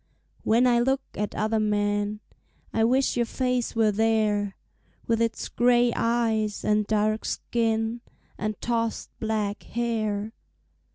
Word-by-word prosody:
When 230 +3 +4
I 240 -1 +4
look 265 +3 +2
at 210 0 -3
other 220 +1 +1
men, 205 0 0 0.5
I 225 - +2
wish 255 +4 +2
your 240 -1 +1
face 250 -2 -1
were 220 -2 +3
there, 210 -2 +1 0.5
With 230 0 +1
its 230 -1 -1
gray 240 0 +3
eyes 225 -3 0
and 210 -1 +2
dark 215 0 +1
skin 225 0 -1 0.3
And 215 0 -3
tossed 230 -1 -1
black 215 -2 -1
hair. 220 -2 -2
225 Hz, 125 wpm, -26 LUFS, 210-235 Hz, 0.5 s, When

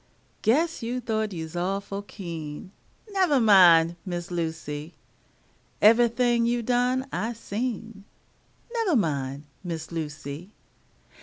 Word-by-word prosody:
Guess 310 +9 +2
you 240 +2 -2
thought 220 -3 -1
you's 160 -2 -6
awful 195 +3 -2
keen; 170 -3 -7 0.4
Nevah 370 -8 +3
min', 175 -6 +6
Miss 175 -1 -5
Lucy. 160 -2 -4 0.8
Evahthing 235 +1 +4
you 240 0 0
done, 250 +2 +1
I 230 +2 -1
seen; 225 -2 -5 0.7
Nevah 450 -9 +1
min', 140 - -1 0.2
Miss 165 -3 -5
Lucy. 155 +3 -6
200 Hz, 100 wpm, -26 LUFS, 165-240 Hz, 0.8 s, min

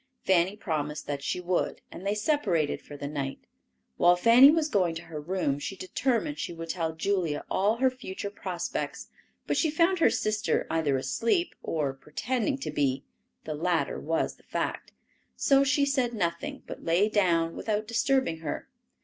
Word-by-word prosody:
Fanny 185 +1 +3
promised 150 -6 -3
that 140 -1 -3
she 145 - -2
would, 180 0 -1
and 190 - -7
they 205 - +1
separated 210 - +1
for 145 - -10
the 140 0 -5
night. 140 -2 -4 0.5
While 175 0 +6
Fanny 235 +8 +8
was 310 0 +3
going 185 - +1
to 165 - -6
her 160 -3 -7
room, 150 -4 -1
she 195 - -5
determined 255 - -1
she - - -3
would 165 0 -7
tell 165 -2 -1
Julia 170 -3 -1
all 205 +4 +2
her 260 +2 +2
future 200 -5 -6
prospects; 180 -4 -4 0.4
but - - 0
she 320 - +3
found 335 +4 +2
her - - +6
sister 215 0 0
either 155 -4 +1
asleep 235 - 0
or 145 -4 -1
pretending 245 - -2
to - - -3
be 135 -2 0 0.4
(the 155 - -4
latter 160 -1 0
was 160 +2 -1
the - - -24
fact); - - -3 0.4
so 275 0 +4
she 280 +1 +3
said 260 -4 0
nothing, 170 -4 -2
but - - -8
lay 175 +5 +3
down 170 -6 +2
without 215 -1 -2
disturbing 245 -6 +1
her. 160 -2 -5
185 Hz, 170 wpm, -28 LUFS, 160-235 Hz, 0.5 s, Fanny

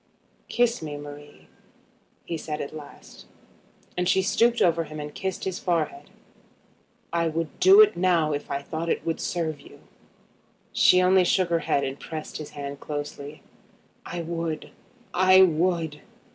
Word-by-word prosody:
"Kiss 240 -3 +1
me, 150 -2 -5
Marie," 145 0 -11 0.8
he 170 - -3
said 150 -1 -5
at 145 - -6
last; 145 -2 -12 0.7
and 180 0 0
she 190 +1 +3
stooped 235 +5 +2
over 165 -1 +2
him 155 0 -8
and 150 0 -6
kissed 190 -2 -4
his 190 -1 -3
forehead. 160 -5 -2 1.0
"I 170 -1 +1
would 160 -2 -3
do 390 +3 +8
it 430 - +5
now 170 -4 +2
if 145 - -5
I 140 0 -3
thought 165 +3 -4
it - - -1
would 165 - -1
serve 160 -4 -3
you." - - -15 0.9
She 180 0 +5
only 185 0 +5
shook 180 0 +2
her 170 - +3
head 140 -2 0
and 135 +1 -4
pressed 155 -2 -6
his 155 - -7
hand 140 0 -6
closely. 145 0 -6 0.6
"I 170 0 -5
would; 165 -1 -4 0.4
I 185 +1 +6
would. 165 -3 0
165 Hz, 155 wpm, -25 LUFS, 150-180 Hz, 1.0 s, do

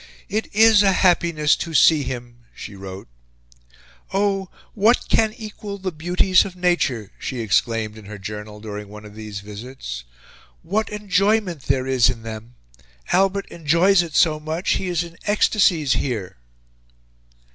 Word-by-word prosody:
"It 215 +2 -1
is 220 0 +6
a 195 -2 +4
happiness 170 -5 +3
to 165 -2 -5
see 155 +2 +6
him," 120 -2 -6 0.2
she 100 - -9
wrote. 95 0 -9 1.0
"Oh! 195 -1 0 0.2
What 220 +4 +3
can 220 -1 +3
equal 210 -2 -7
the 190 -1 -4
beauties 175 +3 +2
of 185 - -8
nature!" 155 - 0
she 130 - -4
exclaimed 110 0 0
in 105 - -14
her 105 +1 -8
journal, 105 +1 -7
during 105 -1 -7
one 105 +1 -11
of 105 - -12
these 105 -2 -7
visits. 105 - -8 0.6
"What 205 +7 -1
enjoyment 200 -4 0
there 130 -1 +1
is 130 -3 +3
in 115 - -5
them! 115 +2 -8 0.6
Albert 195 +1 +2
enjoys 170 +4 +3
it 165 -3 -6
so 155 -2 +4
much; 160 +4 -2
he 190 - 0
is 175 -1 0
in 170 -1 -12
ecstasies 195 -8 +3
here." 110 - -3
155 Hz, 145 wpm, -22 LUFS, -, 1.0 s, is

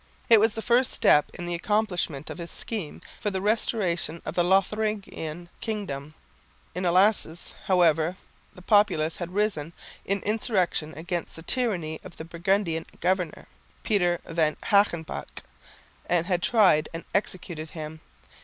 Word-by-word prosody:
It 225 -2 +8
was 220 0 +3
the 225 - -4
first 245 +1 +3
step 150 - +4
in 175 - -6
the 175 - -3
accomplishment 180 - -1
of - - -8
his 170 0 -5
scheme 205 -10 -4 0.2
for 210 - -1
the 190 -1 -2
restoration 190 -6 0
of 155 - -4
the 175 - +2
Lotharingian 190 -3 0
kingdom. 155 -10 -4 0.6
In 180 +1 -3
Elsass, 180 -2 +2
however, 170 -2 +3 0.4
the 180 - -13
populace 180 -7 +3
had 175 +1 -6
risen 180 -7 -1 0.3
in 195 0 -1
insurrection 190 -7 0
against 175 +1 -4
the 165 - -10
tyranny 175 -10 0
of 180 - -12
the 160 - -7
Burgundian 170 0 0
governor, 180 -2 -1 0.4
Peter 175 -6 +2
van 160 -2 0
Hagenbach, 200 -6 +1 0.6
and 170 -1 +2
had 180 -1 0
tried 185 -9 +4
and 165 - -6
executed 175 -5 -2
him. 155 -1 -7
175 Hz, 140 wpm, -26 LUFS, 160-205 Hz, 0.6 s, It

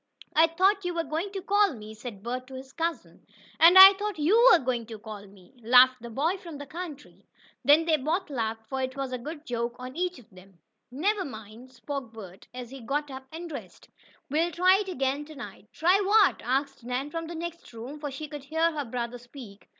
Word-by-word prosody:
"I 320 +1 +6
thought 380 +4 +2
you 355 -1 -3
were 335 - 0
going 330 +5 -3
to 385 -2 -5
call 405 -4 +2
me," 215 -1 -10
said 215 -3 -9
Bert 250 +2 -4
to 265 - -10
his 265 +1 -10
cousin. 335 0 -4 0.4
"And 340 +3 +8
I 385 +1 +12
thought 410 -1 -4
you 430 +12 +5
were 355 - +8
going 245 -5 -3
to 225 -1 -8
call 210 -1 -10
ME," 195 +3 -19
laughed 250 +2 +6
the 235 - -8
boy 310 - -1
from 335 -5 -10
the 285 - -8
country. 305 -1 -9 0.4
Then 305 +3 +5
they 320 -2 +3
both 315 +5 -2
laughed, 225 -3 -3
for 265 -1 -3
it 260 +1 -4
was 270 -1 -3
a 255 - -3
good 300 +4 -8
joke 235 0 -3
on 255 +1 -8
each 360 0 -2
of 235 -3 -18
them. 185 0 -17 0.3
"Never 380 +10 0
mind," 225 - -10
spoke 255 0 -6
Bert, 195 -4 -12
as 250 -1 -8
he 270 -1 -9
got 285 +4 -3
up 265 0 -9
and 335 +2 -7
dressed. 245 - -10 0.4
"We'll 320 +5 +1
try 365 +3 +4
it 405 -2 -4
again 275 -3 -1
to 310 +1 -12
night." 210 -6 -10
"Try 365 +5 +3
what?" 410 0 +4
asked 270 +1 -2
Nan 250 +4 -3
from 330 0 -4
the 340 - -7
next 340 +1 -7
room, 245 +6 -9
for 295 -1 -4
she 280 +3 -7
could 290 -2 -9
hear 320 +3 +1
her 295 -3 -4
brother 240 0 -4
speak. 240 -4 -13
275 Hz, 220 wpm, -27 LUFS, 240-335 Hz, 0.4 s, I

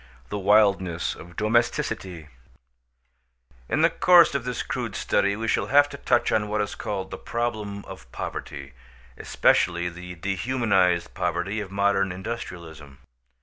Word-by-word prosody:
THE 105 - -3
WILDNESS 100 -4 +2
OF 85 +1 -13
DOMESTICITY 105 -6 -1 1.4
In 155 - +1
the 165 - +5
course 175 -2 +6
of 140 -3 -2
this 125 -1 -3
crude - - -4
study 100 0 +1
we 115 +1 -4
shall - - +1
have 145 +2 +5
to 140 - -8
touch 120 -3 +1
on 105 -1 +1
what 105 0 -2
is 105 0 -2
called 95 -2 -5
the - - -6
problem 110 -4 -4
of - - -12
poverty, 70 -1 -6 0.4
especially 85 0 +1
the 90 +1 -9
dehumanized 95 -1 0
poverty 90 +4 -2
of 100 -3 -6
modern 100 -1 +1
industrialism. 85 - -7
100 Hz, 140 wpm, -25 LUFS, 90-110 Hz, 1.4 s, course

